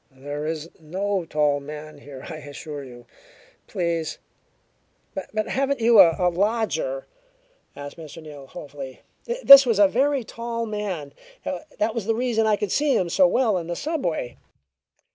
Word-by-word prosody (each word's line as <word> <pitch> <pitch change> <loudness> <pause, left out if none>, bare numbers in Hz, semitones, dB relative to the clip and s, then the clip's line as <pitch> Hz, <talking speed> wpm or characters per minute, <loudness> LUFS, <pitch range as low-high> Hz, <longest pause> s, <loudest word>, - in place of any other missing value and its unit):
There 145 +3 -6
is 160 0 -3
no 190 +3 -2
tall 150 -2 +1
man 150 +1 -9
here, 140 -2 -11
I 160 - -6
assure 145 0 -8
you. 120 -2 -12 0.6
Please 170 -3 -2 0.5
" - - -43 0.2
"But 215 0 -1
haven't 275 +1 0
you 230 -1 +5
a 180 0 +4
lodger?" 230 - -1 0.7
asked 145 +2 -8
Mr. 160 -1 -10
Neal 145 -4 -11
hopefully. 140 -4 -9 0.4
"This 275 -1 +11
was 230 -4 +2
a 205 -1 +7
very 270 +5 +1
tall 230 +1 -4
man; 200 -9 -4 0.3
that 225 -8 -3
was 220 -3 -4
the 225 - +2
reason 230 -2 +1
I 215 - +4
could 205 -2 -3
see 290 -1 +2
him 180 - 0
so 275 +10 +5
well 225 -8 +2
in 165 - -7
the 175 - -3
subway. 175 - -3
180 Hz, 155 wpm, -24 LUFS, 150-230 Hz, 0.7 s, This